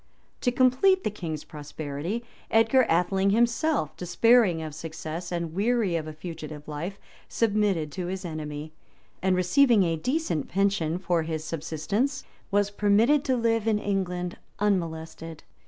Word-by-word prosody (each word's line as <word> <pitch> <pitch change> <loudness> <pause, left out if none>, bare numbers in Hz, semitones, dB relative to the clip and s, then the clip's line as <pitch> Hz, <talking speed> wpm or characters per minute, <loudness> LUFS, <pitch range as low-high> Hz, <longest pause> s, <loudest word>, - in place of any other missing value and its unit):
To 245 - +2
complete 260 +10 +4
the - - 0
king's 160 -7 -5
prosperity, 150 +8 -5 0.2
Edgar 225 +3 +4
Atheling 190 +3 +2
himself, 235 - +1
despairing 195 0 +3
of 155 -1 -6
success, 160 +2 -6
and 170 -2 -3
weary 210 -1 +1
of 160 -2 -2
a 155 - -6
fugitive 155 -2 -8
life, 165 +6 -5 0.3
submitted 205 -8 +1
to 180 +1 -4
his 190 +1 -4
enemy; 155 -1 -6 0.5
and 185 0 +2
receiving 220 +4 +4
a 165 -2 0
decent 250 - -1
pension 190 -4 +1
for 175 -2 0
his 160 -1 -3
subsistence, 165 - -2 0.3
was 205 0 +1
permitted 215 +8 +3
to 260 -2 +2
live 225 -1 +1
in 220 -2 +3
England 180 -3 -2 0.2
unmolested. 165 -5 -2
185 Hz, 140 wpm, -27 LUFS, 160-225 Hz, 0.5 s, complete